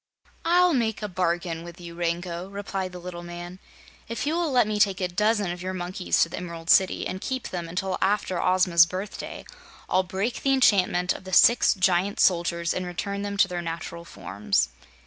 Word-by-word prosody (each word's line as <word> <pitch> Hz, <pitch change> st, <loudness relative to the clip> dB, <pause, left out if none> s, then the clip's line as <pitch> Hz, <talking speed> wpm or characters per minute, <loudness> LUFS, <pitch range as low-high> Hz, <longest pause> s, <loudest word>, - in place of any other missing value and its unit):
"I'll 355 Hz, +1 st, +4 dB
make 225 Hz, -5 st, 0 dB
a -, -, -1 dB
bargain 175 Hz, -2 st, -2 dB
with 175 Hz, +1 st, -11 dB
you, 170 Hz, -1 st, -9 dB
Rango," 175 Hz, +1 st, -3 dB
replied 195 Hz, -2 st, -4 dB
the 180 Hz, -, -8 dB
little 175 Hz, -1 st, -7 dB
man. 175 Hz, +1 st, -8 dB, 0.5 s
"If 230 Hz, +1 st, -3 dB
you 300 Hz, -, 0 dB
will 340 Hz, -1 st, 0 dB
let 245 Hz, -3 st, +4 dB
me 210 Hz, 0 st, -2 dB
take 195 Hz, -3 st, +3 dB
a 185 Hz, -, 0 dB
dozen 210 Hz, +1 st, +1 dB
of 175 Hz, 0 st, -6 dB
your 185 Hz, +1 st, -4 dB
monkeys 180 Hz, 0 st, 0 dB
to 165 Hz, -, -3 dB
the -, -, -6 dB
Emerald 170 Hz, -1 st, -3 dB
City, 190 Hz, -1 st, +4 dB
and 185 Hz, +1 st, -4 dB
keep 260 Hz, -1 st, -3 dB
them 175 Hz, -2 st, -5 dB
until 185 Hz, +2 st, -2 dB
after 195 Hz, -3 st, +1 dB
Ozma's 180 Hz, -2 st, +4 dB
birthday, 190 Hz, +3 st, -6 dB, 0.4 s
I'll 185 Hz, -, +3 dB
break 195 Hz, +6 st, -3 dB
the 275 Hz, -, +2 dB
enchantment 190 Hz, -8 st, +3 dB
of -, -, -10 dB
the 185 Hz, 0 st, -9 dB
six 235 Hz, +4 st, +6 dB
Giant 185 Hz, +1 st, +1 dB
Soldiers 170 Hz, -1 st, +2 dB
and 185 Hz, -, -3 dB
return 200 Hz, +3 st, -4 dB
them 200 Hz, 0 st, -4 dB
to 195 Hz, -, +5 dB
their 180 Hz, -2 st, -4 dB
natural 170 Hz, 0 st, -6 dB
forms." 100 Hz, -, -1 dB
185 Hz, 195 wpm, -25 LUFS, 175-200 Hz, 0.5 s, six